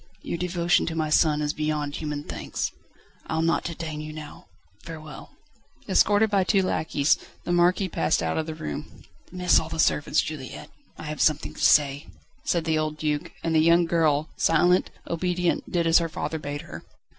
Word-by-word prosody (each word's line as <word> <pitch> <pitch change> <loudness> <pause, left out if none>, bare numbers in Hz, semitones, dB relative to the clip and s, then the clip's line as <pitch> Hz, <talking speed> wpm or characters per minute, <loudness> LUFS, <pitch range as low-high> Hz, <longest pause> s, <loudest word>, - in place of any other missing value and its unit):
Your 170 - -4
devotion 175 -1 +1
to 165 - -3
my 155 -1 -1
son 150 -1 +3
is 150 0 -1
beyond 150 -2 -2
human 150 -2 -4
thanks. - - -4 0.6
I'll 160 0 0
not 165 +1 +1
detain 160 -2 -5
you 155 0 -7
now. 155 -1 -10 0.4
Farewell." 155 -3 -9 0.6
Escorted 210 +1 +3
by 195 -2 +3
two 195 +1 +2
lacqueys, 160 -4 +1 0.2
the - - -3
Marquis 175 +2 +3
passed 85 - 0
out 80 0 -1
of 160 - -2
the 160 - -5
room. 75 - -7 0.2
"Dismiss 180 0 +2
all 160 - -6
the 160 - -5
servants, 150 -2 +2
Juliette; 145 -4 -7 0.3
I - - -9
have 155 0 -4
something 110 - +2
to - - -10
say," 145 -1 +4 0.4
said 170 -2 0
the 160 -1 +1
old 155 0 -2
Duc, 150 -1 -2
and 165 - 0
the 160 - +4
young 170 +2 +5
girl, 160 -3 +1
silent, 175 +3 +3 0.2
obedient, 180 +1 -1
did 170 -2 +1
as 165 +1 +5
her 165 -1 -2
father 160 0 -4
bade 145 0 -5
her. - - -10
160 Hz, 180 wpm, -25 LUFS, 150-170 Hz, 0.6 s, young